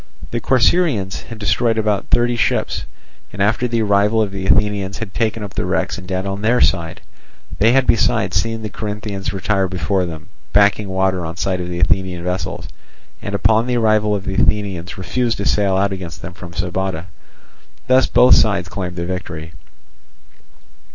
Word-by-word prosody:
The 115 Hz, -, -2 dB
Corcyraeans 130 Hz, -, +2 dB
had 115 Hz, -, -9 dB
destroyed 115 Hz, +2 st, +1 dB
about 105 Hz, -2 st, 0 dB
thirty 120 Hz, 0 st, +2 dB
ships, 120 Hz, -, 0 dB, 0.5 s
and 95 Hz, -, -10 dB
after 110 Hz, +5 st, +2 dB
the 115 Hz, -2 st, 0 dB
arrival 105 Hz, +2 st, +2 dB
of 105 Hz, -3 st, +1 dB
the 95 Hz, -1 st, -4 dB
Athenians 100 Hz, -1 st, +1 dB
had 110 Hz, -4 st, -6 dB
taken 110 Hz, -1 st, -1 dB
up 100 Hz, -, -7 dB
the -, -, -2 dB
wrecks -, -, -1 dB
and 90 Hz, -, -12 dB
dead 95 Hz, 0 st, -2 dB
on 100 Hz, +1 st, -3 dB
their 120 Hz, +3 st, +2 dB
side; 85 Hz, -3 st, +1 dB, 0.6 s
they 115 Hz, +4 st, +5 dB
had 135 Hz, 0 st, +4 dB
besides 110 Hz, -4 st, +2 dB
seen 115 Hz, 0 st, -1 dB
the 110 Hz, -, -3 dB
Corinthians 105 Hz, -2 st, -4 dB
retire 95 Hz, 0 st, 0 dB
before 95 Hz, +1 st, -1 dB
them, 80 Hz, -2 st, -8 dB, 0.3 s
backing 100 Hz, 0 st, +3 dB
water 95 Hz, -1 st, 0 dB
on 80 Hz, 0 st, -5 dB
sight 95 Hz, -1 st, -1 dB
of 90 Hz, -, -5 dB
the 85 Hz, 0 st, -4 dB
Athenian 90 Hz, +1 st, 0 dB
vessels, 90 Hz, -2 st, -3 dB, 0.5 s
and 100 Hz, -, -4 dB
upon 110 Hz, +3 st, +3 dB
the 125 Hz, -1 st, 0 dB
arrival 110 Hz, -2 st, +2 dB
of 100 Hz, -1 st, -4 dB
the -, -, -3 dB
Athenians 95 Hz, -3 st, 0 dB
refuse 115 Hz, +5 st, -1 dB
to 100 Hz, -, -4 dB
sail 100 Hz, -2 st, +2 dB
out 100 Hz, 0 st, +1 dB
against 90 Hz, -3 st, -8 dB
them 85 Hz, +1 st, -7 dB
from 85 Hz, -1 st, -10 dB
Sybota. 90 Hz, -1 st, -3 dB, 0.8 s
Thus 130 Hz, +1 st, +4 dB
both 125 Hz, -, +6 dB
sides 100 Hz, -4 st, +3 dB
claimed 90 Hz, -1 st, -5 dB
the 85 Hz, -1 st, -3 dB
victory. 85 Hz, -3 st, -6 dB
100 Hz, 180 wpm, -19 LUFS, 95-110 Hz, 0.8 s, both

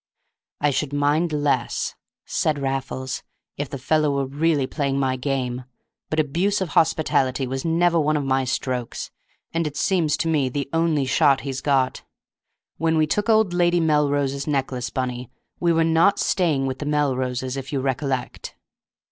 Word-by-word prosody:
"I 145 Hz, 0 st, +2 dB
should 145 Hz, +1 st, -2 dB
mind 145 Hz, +4 st, +1 dB
less," 145 Hz, -5 st, 0 dB, 0.3 s
said 155 Hz, -2 st, 0 dB
Raffles, 135 Hz, -1 st, -3 dB, 0.3 s
"if 145 Hz, -2 st, -4 dB
the 140 Hz, -, -5 dB
fellow 150 Hz, +3 st, +1 dB
were 140 Hz, -1 st, 0 dB
really 145 Hz, +1 st, +1 dB
playing 140 Hz, 0 st, -1 dB
my 130 Hz, -1 st, +1 dB
game. 125 Hz, -2 st, -2 dB, 0.4 s
But 155 Hz, -, -1 dB
abuse 175 Hz, +8 st, +1 dB
of 190 Hz, -3 st, -2 dB
hospitality 145 Hz, -4 st, +2 dB
was 130 Hz, +1 st, -4 dB
never 170 Hz, +1 st, +2 dB
one 155 Hz, 0 st, +2 dB
of 145 Hz, -, -2 dB
my 135 Hz, 0 st, +1 dB
strokes, 125 Hz, -1 st, -3 dB, 0.4 s
and 165 Hz, -1 st, 0 dB
it 145 Hz, -1 st, -6 dB
seems 170 Hz, -4 st, +1 dB
to 165 Hz, -, -1 dB
me 150 Hz, -5 st, +1 dB
the 140 Hz, +2 st, -3 dB
only 165 Hz, -4 st, +2 dB
shot 135 Hz, +1 st, +3 dB
he's 135 Hz, -1 st, -4 dB
got. 135 Hz, -3 st, +1 dB, 0.8 s
When 160 Hz, 0 st, +1 dB
we 155 Hz, -, +4 dB
took 205 Hz, +8 st, -1 dB
old 220 Hz, -5 st, +4 dB
Lady 175 Hz, 0 st, +3 dB
Melrose's 145 Hz, -3 st, +1 dB
necklace, 135 Hz, -4 st, -1 dB
Bunny, 125 Hz, -2 st, -3 dB, 0.3 s
we 170 Hz, -1 st, +2 dB
were 165 Hz, 0 st, +3 dB
not 165 Hz, +4 st, +4 dB
staying 155 Hz, -8 st, +1 dB
with 130 Hz, -1 st, -3 dB
the 145 Hz, -, -4 dB
Melroses, 130 Hz, -3 st, 0 dB
if 135 Hz, 0 st, -6 dB
you 140 Hz, -, 0 dB
recollect." 130 Hz, -1 st, -3 dB
145 Hz, 165 wpm, -23 LUFS, 130-160 Hz, 0.8 s, we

